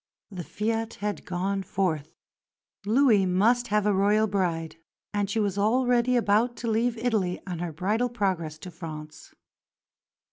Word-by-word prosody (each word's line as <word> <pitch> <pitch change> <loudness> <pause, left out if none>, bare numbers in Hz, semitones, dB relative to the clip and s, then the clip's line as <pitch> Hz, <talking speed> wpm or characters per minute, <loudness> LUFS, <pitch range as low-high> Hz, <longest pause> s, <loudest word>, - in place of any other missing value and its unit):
The 180 -3 -6
fiat 225 +5 -2
had 205 0 -4
gone 195 +2 -1
forth. 175 -6 -2 0.7
Louis 220 -4 +4
must 230 +7 +2
have 210 0 +1
a 210 - +3
Royal 205 +3 +3
bride; 175 -6 -2 0.4
and 205 -1 0
she 220 +2 -1
was 200 -2 0
already 245 +3 +2
about 235 +1 +2
to 235 - -5
leave 230 +2 +1
Italy 215 -7 0
on 180 -3 -5
her 175 -1 -3
bridal 210 +10 0
progress 185 -9 -2
to 180 +4 -9
France. 155 -3 -9
205 Hz, 145 wpm, -26 LUFS, 180-225 Hz, 0.7 s, Louis